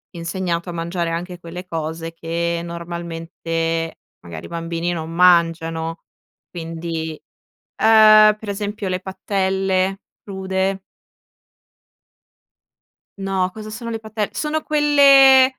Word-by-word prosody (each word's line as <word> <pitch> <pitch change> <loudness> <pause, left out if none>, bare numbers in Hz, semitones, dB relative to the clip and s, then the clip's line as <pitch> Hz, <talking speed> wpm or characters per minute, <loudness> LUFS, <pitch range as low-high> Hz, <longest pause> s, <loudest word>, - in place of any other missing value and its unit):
insegnato 170 0 -3
a 175 - -5
mangiare 170 0 -2
anche 175 +1 -5
quelle 175 +2 -8
cose 165 0 -4
che 170 +1 -2
normalmente 165 -1 -4 0.2
magari 85 -2 -9
i - - -8
bambini 170 0 -3
non 165 -1 -4
mangiano. 165 -2 +2 0.5
Quindi, 165 -1 -5 0.6
uhm, 215 -1 +7
per 215 -2 -8
esempio 205 0 -4
le 185 0 -1
patelle 190 0 -1 0.2
crude. 190 -1 -2 2.4
No, 190 -1 0
cosa 215 +1 -8
sono 230 +2 -6
le 225 -1 -4
pattel 220 -1 -3
sono 310 0 -2
quelle, 280 -3 +6
180 Hz, 105 wpm, -20 LUFS, 165-200 Hz, 2.4 s, uhm